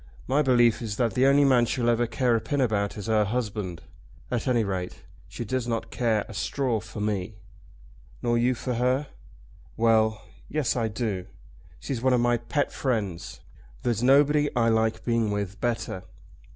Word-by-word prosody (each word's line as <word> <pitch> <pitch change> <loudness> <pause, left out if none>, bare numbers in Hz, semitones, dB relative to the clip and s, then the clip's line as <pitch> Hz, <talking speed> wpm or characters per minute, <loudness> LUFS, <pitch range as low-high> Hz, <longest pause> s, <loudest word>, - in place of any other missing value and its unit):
My 140 +3 +2
belief 120 -5 +3
is 105 -3 -4
that 120 -3 +1
the 130 +1 +3
only 140 +1 +5
man 125 -3 +4
she'll 120 0 -1
ever 120 0 +2
care 125 0 +1
a 115 - 0
pin 145 -1 -2
about 105 -6 0
is 105 - -6
her 110 -1 +3
husband. 105 -5 -3 0.5
At 125 +1 -1
any 120 -3 +3
rate 95 -3 -4 0.2
she 120 - -6
does 130 +1 -2
not 115 -1 -3
care 115 -4 0
a 110 - -9
straw 120 +3 -1
for 110 0 -9
me." 105 -1 -2 0.9
"Nor 120 -1 +2
you 125 +2 +2
for 125 +1 -3
her?" 125 +4 +1 0.7
"Well; 110 -1 +2 0.3
Yes 145 -5 0
I 115 -3 0
do. 105 -4 -3 0.5
She's 130 -4 -4
one 130 0 +3
of 125 - +3
my 120 0 +2
pet 120 +5 -1
friends. 105 -10 -3 0.4
There's 120 -2 0
nobody 145 +3 +4
I 115 -1 +3
like 110 0 +1
being 115 -2 +1
with 100 -1 -3
better." 115 -6 -2
115 Hz, 175 wpm, -26 LUFS, 110-125 Hz, 0.9 s, only